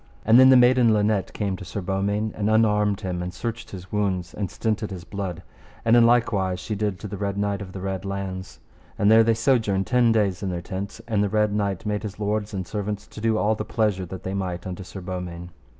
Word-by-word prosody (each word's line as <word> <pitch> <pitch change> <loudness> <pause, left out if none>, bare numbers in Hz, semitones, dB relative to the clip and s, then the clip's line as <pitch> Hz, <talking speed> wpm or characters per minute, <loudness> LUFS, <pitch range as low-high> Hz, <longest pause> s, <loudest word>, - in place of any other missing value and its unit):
And 115 +3 +7
then 130 0 +8
the 130 - +8
maiden 125 -2 +5
Linet 105 -2 +1
came 100 -3 -2
to - - -9
Sir 95 - -5
Beaumains, 100 +3 -1
and 105 0 -1
unarmed 105 -2 +3
him 90 -3 -3
and 90 0 -4
searched 115 +5 -5
his 95 -1 -10
wounds, 95 -4 -1
and 100 -3 -3
stinted 110 -1 -2
his 90 -3 -7
blood, 95 -3 -5 0.4
and 115 +1 +5
in 120 -1 +7
likewise 100 -6 +2
she 105 - -4
did 105 -2 -1
to 105 - -5
the 100 0 -6
Red 100 0 -2
Knight 100 0 -1
of 95 -2 -7
the 95 - -7
Red 95 -1 -3
Launds. 100 -1 -5 0.4
And 105 +1 +4
there 115 0 +7
they 115 0 +3
sojourned 110 -5 +2
ten 120 +4 +3
days 100 -5 +1
in 100 - -2
their 90 -1 -2
tents; 95 +3 -6
and 105 -3 +1
the 100 - 0
Red 105 0 +1
Knight 100 -3 -1
made 105 -1 -1
his 105 -1 -7
lords 105 0 -1
and 95 -3 -4
servants 105 +1 -4
to 105 - -10
do 110 -1 +2
all 110 +1 +2
the 110 - -3
pleasure 105 -5 0
that 95 +1 -8
they 95 - -3
might 90 -3 -3
unto 95 0 -5
Sir 95 +1 -9
Beaumains. 90 -1 -6
100 Hz, 235 wpm, -24 LUFS, 95-110 Hz, 0.4 s, then